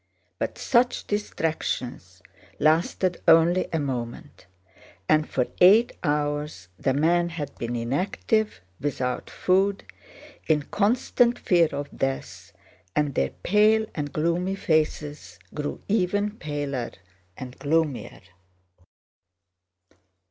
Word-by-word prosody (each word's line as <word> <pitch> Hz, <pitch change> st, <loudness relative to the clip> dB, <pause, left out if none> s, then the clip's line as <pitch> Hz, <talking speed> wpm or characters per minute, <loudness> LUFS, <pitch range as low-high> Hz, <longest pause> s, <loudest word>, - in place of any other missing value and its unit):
But -, -, -3 dB
such 245 Hz, 0 st, +2 dB
distractions 130 Hz, -, -3 dB, 0.3 s
lasted 170 Hz, +3 st, +1 dB
only 165 Hz, +3 st, +5 dB
a 165 Hz, -, 0 dB
moment, 125 Hz, -5 st, -5 dB, 0.6 s
and 155 Hz, 0 st, +3 dB
for 125 Hz, -, +1 dB
eight 210 Hz, +7 st, +7 dB
hours 145 Hz, -, -2 dB
the 135 Hz, -, +1 dB
men 170 Hz, +4 st, +2 dB
had 150 Hz, -5 st, -6 dB
been 120 Hz, +1 st, -3 dB
inactive, 185 Hz, -, -1 dB, 0.2 s
without 130 Hz, -2 st, -2 dB
food, 195 Hz, +2 st, +1 dB, 0.6 s
in 150 Hz, -2 st, +2 dB
constant 235 Hz, -, +2 dB
fear 170 Hz, -3 st, +3 dB
of 145 Hz, 0 st, -5 dB
death, 135 Hz, 0 st, -4 dB, 0.4 s
and 150 Hz, -2 st, +1 dB
their 65 Hz, -, +1 dB
pale 215 Hz, +3 st, +4 dB
and 145 Hz, -2 st, -4 dB
gloomy 170 Hz, +4 st, 0 dB
faces 150 Hz, -, -1 dB, 0.2 s
grew 150 Hz, -1 st, -4 dB
ever 205 Hz, 0 st, +1 dB
paler 145 Hz, -, -4 dB, 0.4 s
and 125 Hz, 0 st, -9 dB
gloomier. 150 Hz, -2 st, -1 dB
155 Hz, 100 wpm, -25 LUFS, 140-185 Hz, 0.6 s, eight